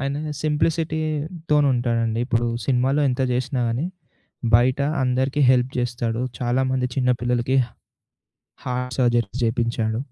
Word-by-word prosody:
ఆయన 140 +3 -3
సింప్లిసిటీతోనుంటాడండి. 150 -7 0
ఇప్పుడు 120 -1 +1 0.2
సినిమాలో 135 +2 +2
ఎంత 125 0 -1
జేసినా 130 +1 -1
గానీ 120 +8 -1 0.7
బయట 125 +3 +4 0.2
అందరికి 130 +3 +1
హెల్ప్ 125 0 +3
జేస్తాడు. 120 -1 -1 0.2
చాలామంది 130 +1 0
చిన్నపిల్లలకి 125 0 +1 1.1
హార్ట్ 125 0 -3
సర్జరీ 120 -4 +2
చేపించాడు. 115 -1 0
125 Hz, 95 wpm, -23 LUFS, 120-140 Hz, 1.1 s, బయట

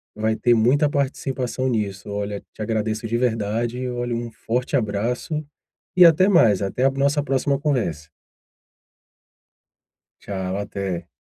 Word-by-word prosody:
vai 110 +1 0
ter 120 +1 +3
muita 130 +7 +3
participação 130 -2 -1
nisso. 100 -4 -2
Olha, 100 0 -3
te - - -10
agradeço 110 0 -1
de 115 - -2
verdade, 115 0 -1
e 125 0 -3
olhe, 120 0 -3
um 120 0 -4
forte 125 +4 -2
abraço 125 - -1 0.5
e 180 - +8
até 170 +3 +6
mais, 115 - +5
até 100 +6 -1
a 135 - +5
nossa 140 +2 +1
próxima 140 0 0
conversa. 115 - -1 2.1
Tchau, 95 -1 -4
até. 100 -4 -4
120 Hz, 135 wpm, -22 LUFS, 105-135 Hz, 2.1 s, e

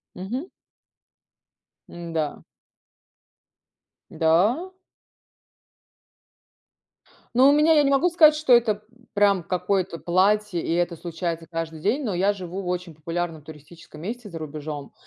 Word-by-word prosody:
Мгм. 235 - -5 1.4
М-да. 165 -3 -4 1.7
Да? 210 - +1 2.6
Ну 260 +3 +7
у - - +6
меня 300 +2 +4
я 300 - +5
не 275 - +2
могу 280 +6 +3
сказать, 315 -3 +6
что 300 -4 +3
это, 220 -3 +3 0.2
м, 240 - -23
прям 200 -2 +3
какое-то 185 0 -1
платье, 190 +2 +1
и - - -3
это 175 0 0
случается 165 0 -5
каждый 165 -1 -5
день. 225 - 0
Но 215 -6 -2
я 190 +3 +2
живу 185 -1 -6
в 185 - -7
очень 180 -2 -3
популярном 165 +1 -4
туристическом 155 +1 -13
месте 225 +4 -6
за 170 - -7
рубежом, 150 -2 -7
180 Hz, 125 wpm, -24 LUFS, 165-230 Hz, 2.6 s, Ну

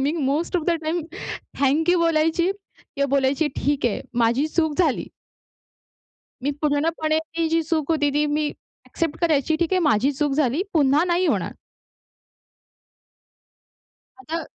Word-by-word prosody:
Me 280 +3 +1
most 315 +3 0
of 335 - -1
the - - +3
time 325 +1 -1 0.6
thank 300 +5 +3
you 355 - +3
बोलायची 330 +2 +2
किंवा 280 -7 -6
बोलायची, 275 +3 +2
"ठीक 280 -3 0
आह, 220 - -1 0.2
माझी 240 +6 +2
चूक 315 -2 0
झाली." 315 -8 +1 1.4
मी 285 - +1
पूर्णपणे 310 +1 +1 0.2
ही 330 -1 +2
जी 330 0 +2
चूक 315 -1 -1
होती, 290 -2 +2
ती 295 +1 +2
मी 295 0 0 0.4
ॲक्सेप्ट 325 -3 -3
करायची, 315 -2 +2
"ठीक 340 +3 0
आहे, 370 - +3
माझी 270 -3 +2
चूक 290 +1 -1
झाली, 290 +2 +1
पुन्हा 295 0 +4
नाही 355 +1 +1
होणार." - - 0 2.7
आता 330 -4 -4
310 Hz, 140 wpm, -23 LUFS, 285-330 Hz, 2.7 s, पुन्हा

